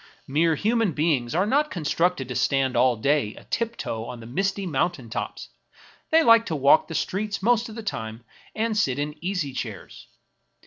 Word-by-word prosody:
Mere 160 +4 +2
human 220 +1 +1
beings 145 -5 0
are 185 +3 +3
not 290 +7 +2
constructed 165 -3 0
to 125 - -4
stand 135 -1 +1
all 125 +1 +4
day 115 -1 0
a - - -13
tiptoe 230 - -3
on 120 0 -7
the 115 - -10
misty 195 - -1
mountain 140 -6 -2
tops; 120 - -5 0.6
they 325 +1 +5
Uke 230 -5 +6
to 160 - -2
walk 140 +2 +4
the 165 - -6
streets 200 +5 -2
most 240 +1 +2
of 215 - -9
the 225 - -6
time 110 - -5 0.3
and 220 0 0
sit 140 -11 +1
in 145 +1 -2
easy 175 -7 -2
chairs. 110 -6 -7
160 Hz, 180 wpm, -25 LUFS, 130-210 Hz, 0.6 s, Uke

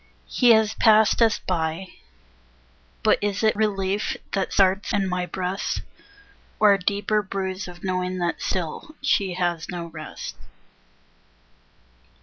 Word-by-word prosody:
He 245 - +2
has 220 -1 +3
passed 220 0 +4
us 225 -2 +4
by; 170 +1 -2 1.1
but - - +4
is 205 +1 -1
it 215 - +3
Relief 200 -1 0
that 195 -2 -1
starts 195 +1 +2
in 195 -2 +1
my 180 -1 -2
breast? 185 +2 -3 0.8
Or 210 -2 +6
a 195 - 0
deeper 205 +3 0
bruise 190 0 -4
of 175 -1 -12
knowing 185 -1 -1
that 175 -2 -2
still 185 - -4
She 195 -10 +1
has 175 -2 -1
no 175 -1 -4
rest. 155 -2 -8
190 Hz, 130 wpm, -24 LUFS, 180-205 Hz, 1.1 s, Or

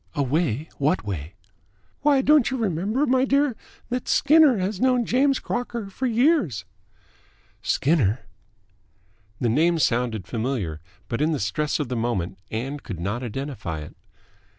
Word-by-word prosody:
"A 145 - +1
way? 145 0 0
What 150 +6 +1
way?" 90 -3 -5 0.7
"Why, 285 -2 +4
don't 300 -3 +5
you 260 - -2
remember, 215 - 0
my 260 -1 +3
dear, 275 -1 +2 0.3
that 250 +1 -3
Skinner 295 -4 +5
has 190 +1 -2
known 250 -2 +3
James 270 +3 +3
Crocker 235 -4 -4
for 260 +7 -2
years." 230 - +2 1.0
"Skinner?" 130 - +1 1.2
The 120 - +1
name 165 +8 +3
sounded 120 - 0
familiar, 110 - -3 0.3
but 115 +6 -3
in 155 +2 +2
the 150 - -1
stress 145 +12 -1
of 145 - -1
the 125 - -3
moment 105 -6 -2
Ann 135 +6 -4
could 100 - -7
not 100 +8 -2
identify 120 - -5
it. 75 - -10
150 Hz, 145 wpm, -24 LUFS, -, 1.2 s, don't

